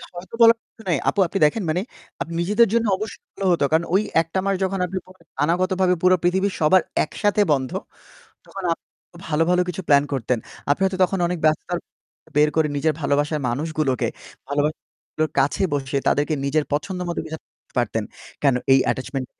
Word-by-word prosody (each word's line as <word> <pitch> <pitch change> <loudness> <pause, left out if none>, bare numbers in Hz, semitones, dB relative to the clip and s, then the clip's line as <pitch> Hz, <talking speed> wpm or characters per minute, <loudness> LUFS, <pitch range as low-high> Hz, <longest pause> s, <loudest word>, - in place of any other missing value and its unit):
হয়তো 185 +6 -8
বলার 230 0 +8
কিছু - - -19
নাই 160 - +3
আপু 205 - -2
আপনি 195 - -3
দেখেন 200 +7 +1
মানে 175 +4 +1 0.6
নিজেদের 210 +6 +4
জন্য 230 0 +2
অবশ্যই 215 +1 -7
ভালো 195 - -5
হতো 165 -5 +2
কারণ 160 +2 +3
ওই 200 - +5 0.2
১টা 165 +4 -3
মাস 195 -1 +1
যখন 195 0 -1
আপনি 185 +2 -5
পরে 185 -2 -18 0.2
অনাগত 180 +4 +1
ভাবে 180 -1 +4
পুরো 185 0 +5
পৃথিবীর 190 +2 +1
সবার 170 +4 +5 0.2
একসাথে 205 +6 0
বন্ধ। 130 -3 +1 0.7
তখন 195 -1 -8
আপনি - - -18 0.4
ভালো, 160 +1 +2
ভালো 180 0 +4
কিছু 180 +2 -4
প্ল্যান 140 -1 +5
করতেন। 125 -1 0 0.3
আপনি 145 - 0
হয়তো 190 -1 -1
তখন 190 0 -3
অনেক 175 0 -3
ব্যস্ততার 155 +3 +1 0.6
বের 150 0 +5
করে 160 -1 +3
নিজের 155 +2 +1
ভালোবাসার 145 +2 0
মানুষগুলোকে 150 0 -1 0.4
ভালোবাসার 145 +2 0
মানুষগুলোর 155 0 -5
কাছে 140 +7 +1
বসে 140 -1 -1
তাদেরকে 145 +2 +2
নিজের 145 +2 +1
পছন্দ 180 +5 -2
মতো 170 - -2
কিছু 160 0 -6 0.4
পারতেন। 115 -2 0 0.4
কেন 135 -3 +4 0.2
এই 135 - +6
attachment 130 0 -4
165 Hz, 175 wpm, -22 LUFS, 145-190 Hz, 0.7 s, বলার